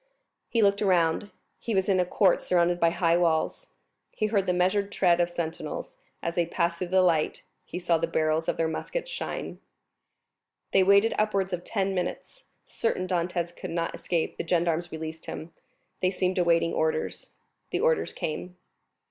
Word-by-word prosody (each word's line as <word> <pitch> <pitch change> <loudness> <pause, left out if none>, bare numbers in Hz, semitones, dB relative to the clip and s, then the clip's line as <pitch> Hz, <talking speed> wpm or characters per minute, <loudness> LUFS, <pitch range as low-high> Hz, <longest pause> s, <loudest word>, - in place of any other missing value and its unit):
He 230 -2 +2
looked 200 0 +3
around; 180 0 +2 0.3
he 225 -2 -2
was 190 -1 +2
in 190 -2 +3
a 180 - +3
court 185 +1 +3
surrounded 175 0 +2
by 170 - +4
high 170 0 +2
walls; 170 - 0 0.4
he 215 - -2
heard 205 -3 +1
the - - +3
measured 190 +3 +1
tread 175 -3 +3
of 175 - +1
sentinels, 170 - -5 0.3
and - - 0
as 170 - -8
they 170 -1 +1
passed 170 -1 -1
before 180 - -3
the 185 0 +4
light 165 -4 +1 0.2
he - - -6
saw 175 -2 +1
the 165 - 0
barrels 160 0 0
of - - -1
their 165 - +1
muskets - - -4
shine. - - -5 1.1
They 195 - +5
waited 200 +4 +5
upwards 195 -3 +1
of 175 0 -3
ten 195 -1 -1
minutes. 185 - -4 0.2
Certain 205 -5 -1
Dantès 175 -1 -1
could - - -7
not 165 0 -2
escape, 170 -3 -2
the - - -4
gendarmes 170 0 +1
released 160 0 -6
him. 160 +1 -7 0.5
They 185 - +3
seemed 185 0 0
awaiting 170 -1 +3
orders. 160 0 -1 0.4
The - - -1
orders 485 0 +2
came. 180 +3 -5
175 Hz, 175 wpm, -27 LUFS, 170-195 Hz, 1.1 s, They